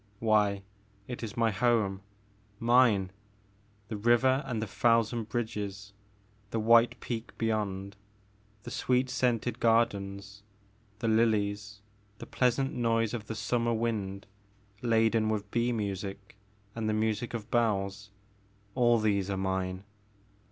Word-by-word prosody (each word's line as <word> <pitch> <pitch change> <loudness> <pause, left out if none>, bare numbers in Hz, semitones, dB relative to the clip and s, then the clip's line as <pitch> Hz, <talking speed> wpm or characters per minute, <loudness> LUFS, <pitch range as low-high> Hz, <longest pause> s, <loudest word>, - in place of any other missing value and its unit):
Why, 105 -2 +2 0.4
it 125 - -6
is 115 -2 -6
my 115 -1 +2
home, 105 -3 +1 0.3
— 105 0 -35
mine! 105 -7 +4 0.8
The 105 - -4
river 120 +5 +3
and 120 -4 -2
the 110 - -2
thousand 115 +2 +1
bridges, 105 -3 -4 0.6
the 115 - -2
white 115 +2 +4
peak 115 -1 -6
beyond, 100 -3 -2 0.7
the 120 - -8
sweet 125 0 +1
scented 120 -1 0
gar 115 0 +5
dens, 100 0 -9 0.6
the 115 +2 -3
lilies, 105 -2 +1 0.3
the - - -8
pleasant 130 +2 +1
noise 115 -2 +1
of 110 -3 -5
the 110 - -4
summer 115 +1 0
wind 105 -4 -2 0.6
laden 115 -2 +2
with 105 -1 -3
bee 120 +1 +1
music 100 -2 -4 0.4
and 110 -1 -2
the - - +1
music 110 +2 -1
of 110 0 -7
bells, 105 -3 0 0.3
— 100 0 -35
all 120 -2 +4
these 100 -3 0
are 100 - -1
mine. 95 0 -2
110 Hz, 130 wpm, -30 LUFS, 100-115 Hz, 0.8 s, gar